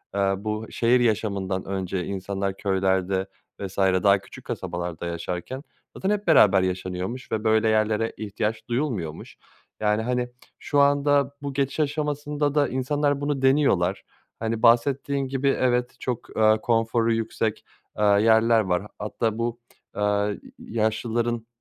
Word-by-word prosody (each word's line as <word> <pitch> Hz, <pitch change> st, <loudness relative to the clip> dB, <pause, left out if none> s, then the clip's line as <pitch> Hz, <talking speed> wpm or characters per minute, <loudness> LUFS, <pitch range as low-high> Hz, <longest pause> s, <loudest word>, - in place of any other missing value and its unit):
eee, -, -, 0 dB, 0.2 s
bu 110 Hz, +2 st, -4 dB
şehir 120 Hz, +2 st, +3 dB
yaşamından 100 Hz, -5 st, 0 dB
önce 95 Hz, -1 st, -3 dB
insanlar 95 Hz, 0 st, -3 dB
köylerde 95 Hz, -1 st, 0 dB, 0.3 s
vs. 100 Hz, -1 st, -6 dB
daha 95 Hz, +1 st, +4 dB
küçük -, -, -14 dB
kasabalarda 85 Hz, -1 st, -4 dB
yaşarken 85 Hz, -, -4 dB, 0.3 s
zaten 190 Hz, -, -2 dB
hep 210 Hz, -2 st, -1 dB
beraber 100 Hz, -, +6 dB
yaşanıyormuş 95 Hz, +6 st, -3 dB
ve 110 Hz, -1 st, -1 dB
böyle 110 Hz, 0 st, +3 dB
yerlere 110 Hz, +1 st, +1 dB
ihtiyaç 110 Hz, +1 st, -3 dB
duyulmuyormuş. 115 Hz, -, -3 dB, 0.4 s
Yani, 105 Hz, 0 st, +1 dB
hani, 125 Hz, +1 st, -1 dB, 0.3 s
şu 145 Hz, -, 0 dB
anda 140 Hz, 0 st, +3 dB
bu 140 Hz, -1 st, -4 dB
geçiş 140 Hz, +2 st, -1 dB
aşamasında 145 Hz, 0 st, -1 dB
da 145 Hz, -1 st, +3 dB
insanlar 145 Hz, +2 st, 0 dB
bunu 145 Hz, -2 st, -1 dB
deniyorlar. 135 Hz, -10 st, +2 dB, 0.4 s
Hani, 115 Hz, 0 st, -2 dB
bahsettiğin 135 Hz, +3 st, +3 dB
gibi 135 Hz, +1 st, -1 dB
evet 125 Hz, -1 st, +1 dB
çok, 125 Hz, -3 st, -5 dB
eee, 110 Hz, 0 st, +5 dB
konforu 115 Hz, 0 st, +1 dB
yüksek, 110 Hz, -1 st, -2 dB, 0.3 s
eee, -, -, +2 dB
yerler 110 Hz, +2 st, +5 dB
var. 90 Hz, -3 st, 0 dB
H -, -, -10 dB
hatta 110 Hz, +1 st, -2 dB
bu, 120 Hz, 0 st, -2 dB, 0.4 s
eee, 105 Hz, -, -4 dB
y 105 Hz, 0 st, +1 dB, 0.2 s
yaşlıların 115 Hz, +1 st, -1 dB
110 Hz, 135 wpm, -25 LUFS, 100-130 Hz, 0.4 s, beraber